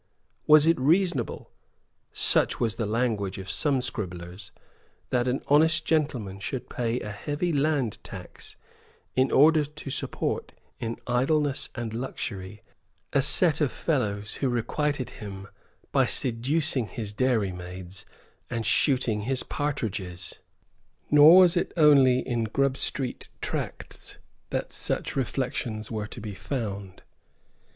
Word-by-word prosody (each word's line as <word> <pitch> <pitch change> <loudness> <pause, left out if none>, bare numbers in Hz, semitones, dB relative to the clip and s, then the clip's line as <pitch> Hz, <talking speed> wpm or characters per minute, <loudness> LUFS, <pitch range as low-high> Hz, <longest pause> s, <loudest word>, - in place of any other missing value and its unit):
Was 150 0 +7
it 165 -2 +3
reasonable, 155 - +1 0.6
such - - +3
was 115 -3 +1
the 115 - -1
language 110 -4 -1
of 95 -1 -5
some 135 +1 +1
scribblers, 90 -4 -6 0.6
that 125 0 +1
an 125 +2 -1
honest 155 +3 +4
gentleman 125 -12 -1
should 125 +5 -5
pay 120 0 -1
a 105 - -5
heavy 145 - -2
land 140 -6 0
tax, - - -10 0.6
in 130 +1 +3
order 155 +2 +6
to 150 -1 -9
support - - -3 0.3
in 115 0 -3
idleness 135 +3 +1
and 120 -3 -4
luxury 105 -5 -5 0.5
a 140 - +4
set 155 +3 +4
of 145 - +2
fellows 110 -9 -1
who 135 - 0
requited 130 +3 -1
him 95 -2 -7 0.4
by - - +3
seducing 130 +1 0
his 105 -2 -5
dairy 115 -4 +1
maids 90 +1 -8 0.5
and 115 -2 -3
shooting 125 -7 +2
his 130 -1 0
partridges? 100 - -4 0.7
Nor 150 +4 +9
was 180 -1 +5
it 175 - -1
only 135 -5 +5
in 120 -2 0
Grub 135 +4 +1
Street 130 -2 -2
tracts - - -5 0.3
that - - -3
such - - -1
reflections 120 -4 -2
were 105 -2 -3
to 120 - -8
be 105 -2 -6
found. 100 -3 -5
125 Hz, 130 wpm, -27 LUFS, 105-145 Hz, 0.7 s, Nor